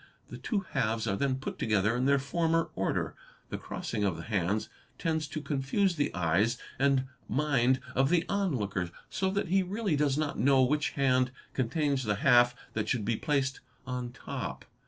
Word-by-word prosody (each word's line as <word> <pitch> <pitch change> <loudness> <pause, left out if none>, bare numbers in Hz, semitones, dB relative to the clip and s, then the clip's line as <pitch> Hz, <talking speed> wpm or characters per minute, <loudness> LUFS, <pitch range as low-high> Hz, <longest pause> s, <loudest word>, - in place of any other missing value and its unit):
The - - -8
two 210 -4 -1
halves 115 -4 0
are 100 -3 0
then 135 +4 +1
put 130 - -6
together 110 0 +2
in 125 +1 0
their 140 +1 +5
former 165 +4 0
order. 95 - -1 0.4
The - - -4
crossing 105 - -4
of 95 -5 +1
the 80 - -7
hands 100 0 0 0.3
tends 160 -2 -1
to 150 +2 -5
confuse 150 +7 +1
the 145 -2 0
eyes 95 +8 +2 0.2
and 135 -1 +3 0.3
mind 130 -3 +2
of 135 +1 +3
the 170 0 +3
onlooker, 105 - -1 0.2
so 190 - 0
that 200 -2 -1
he 195 +2 +4
really 195 -1 -1
does 145 -1 +2
not 155 -2 -1
know 135 +2 +5
which 150 +4 +1
hand 130 -2 +3 0.2
contains 140 +2 0
the 105 -2 +1
half 120 +2 +5 0.2
that 110 -1 -2
should 120 -5 0
be 115 +1 +1
placed 135 0 0 0.3
on 125 -1 -4
top. 125 - -6
135 Hz, 175 wpm, -30 LUFS, 115-150 Hz, 0.4 s, their